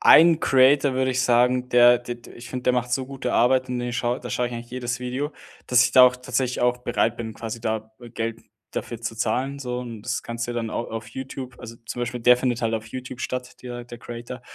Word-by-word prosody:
einen 165 Hz, 0 st, +7 dB
Creator, 135 Hz, +1 st, +4 dB
würde 130 Hz, 0 st, +1 dB
ich 130 Hz, -, 0 dB
sagen, 125 Hz, 0 st, +3 dB
der 120 Hz, 0 st, +7 dB
d 120 Hz, 0 st, -6 dB
d 120 Hz, -1 st, -15 dB
ich 120 Hz, +1 st, -11 dB
finde, 125 Hz, -1 st, -5 dB
der 125 Hz, -, +3 dB
macht 125 Hz, 0 st, -1 dB
so 130 Hz, +1 st, 0 dB
gute 130 Hz, -2 st, -4 dB
Arbeit 130 Hz, +1 st, +3 dB
und 125 Hz, -1 st, -2 dB
den 120 Hz, 0 st, -3 dB
schaue 120 Hz, +1 st, 0 dB
da 125 Hz, -, -8 dB
schaue 125 Hz, -, 0 dB
ich 120 Hz, -, -5 dB
eigentlich 120 Hz, 0 st, -8 dB
jedes 125 Hz, -1 st, -3 dB
Video, 130 Hz, +4 st, -3 dB, 0.4 s
dass 125 Hz, 0 st, +5 dB
ich -, -, 0 dB
da 130 Hz, -1 st, +9 dB
auch 125 Hz, 0 st, +1 dB
tatsächlich 125 Hz, 0 st, -1 dB
auch 125 Hz, 0 st, +2 dB
bereit 120 Hz, -2 st, 0 dB
bin, 110 Hz, -2 st, -5 dB
quasi 115 Hz, 0 st, -6 dB
da 110 Hz, -1 st, -3 dB, 0.2 s
Geld 115 Hz, 0 st, -3 dB, 0.3 s
dafür 115 Hz, -, -5 dB
zu 115 Hz, -1 st, -4 dB
zahlen 125 Hz, +5 st, -1 dB
so. 125 Hz, -2 st, -3 dB
Und 115 Hz, -3 st, -7 dB
das 125 Hz, +1 st, -2 dB
kannst 115 Hz, 0 st, -4 dB
du 120 Hz, -, -3 dB
dir -, -, -8 dB
dann 115 Hz, -1 st, -2 dB
au 115 Hz, -, -3 dB
auf 115 Hz, 0 st, -6 dB
YouTube, 130 Hz, -1 st, -7 dB
also, 115 Hz, -1 st, -9 dB
zum 120 Hz, -, -5 dB
Beispiel 120 Hz, 0 st, -3 dB
der 125 Hz, +1 st, +6 dB
findet 125 Hz, -2 st, -1 dB
halt 115 Hz, 0 st, +1 dB
auf 110 Hz, 0 st, -2 dB
YouTube 130 Hz, +1 st, -7 dB
statt, 125 Hz, 0 st, -5 dB
der 120 Hz, -1 st, -6 dB
der 120 Hz, -1 st, -10 dB
Creator, 120 Hz, +1 st, -8 dB
125 Hz, 250 wpm, -24 LUFS, 120-125 Hz, 0.4 s, da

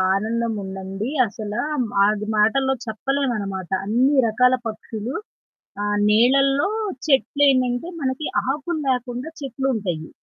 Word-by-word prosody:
ఆనందం 225 Hz, +3 st, -1 dB
ఉండండి 190 Hz, +4 st, -5 dB, 0.2 s
అసలా 210 Hz, +1 st, -4 dB
హ్మ్, 250 Hz, -5 st, 0 dB, 0.2 s
అది 210 Hz, 0 st, 0 dB
మాటల్లో 265 Hz, +6 st, +3 dB
చెప్పలేవనమాట. 220 Hz, -6 st, -2 dB, 0.2 s
అన్ని 250 Hz, +7 st, +3 dB
రకాల 250 Hz, +3 st, +4 dB
పక్షులు 220 Hz, +2 st, -5 dB, 0.7 s
ఆహ్, 205 Hz, 0 st, 0 dB
నీలల్లో 275 Hz, -, +4 dB, 0.4 s
చెట్లేంటంటే 270 Hz, -1 st, +2 dB
మనకి 270 Hz, +2 st, -2 dB, 0.2 s
ఆకులు 305 Hz, +3 st, -2 dB
లేకుండా 250 Hz, +2 st, -2 dB
చెట్లుంటయి. 225 Hz, -, -2 dB
240 Hz, 100 wpm, -22 LUFS, 210-270 Hz, 0.7 s, రకాల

